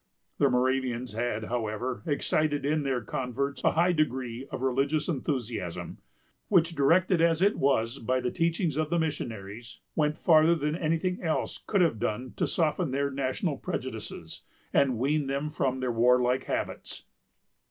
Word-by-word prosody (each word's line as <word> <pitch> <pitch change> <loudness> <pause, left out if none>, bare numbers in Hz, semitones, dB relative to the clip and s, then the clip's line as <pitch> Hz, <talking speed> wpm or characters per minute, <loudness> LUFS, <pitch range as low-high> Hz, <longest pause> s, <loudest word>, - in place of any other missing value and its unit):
The 140 - +4
Moravians 125 -1 0
had, 115 -1 -2
however, 115 +2 -3
excited 145 -1 0
in 155 +1 +1
their 135 -3 -1
converts 140 +1 -3
a - - +3
high 175 +3 +3
degree 130 -5 -1
of 130 - -5
religious 140 +4 +1
enthusiasm; 125 - -3 0.5
which, 170 -4 +3
directed 165 +4 +3
as 165 +1 +3
it 205 +2 +4
was 135 -2 +1
by 130 +3 0
the 125 -1 -2
teachings 170 -3 0
of 155 -1 0
the 170 - +1
missionaries, 115 -8 -4 0.2
went 150 -1 +1
farther 160 0 +5
than 150 -1 -1
any 165 -1 +1
thing 180 +2 -2
else 160 -3 -1
could 200 -3 +2
have 160 -11 +2
done 125 +5 -3
to - - +1
soften 155 -4 0
their 140 +2 0
national 135 -1 -1
prejudices, - - -5 0.3
and 130 -4 +3
wean 140 +4 +1
them 140 +2 -2
from 130 -3 -1
their 125 -1 0
warlike 125 +2 +3
habits. - - -4
140 Hz, 155 wpm, -28 LUFS, 125-155 Hz, 0.5 s, farther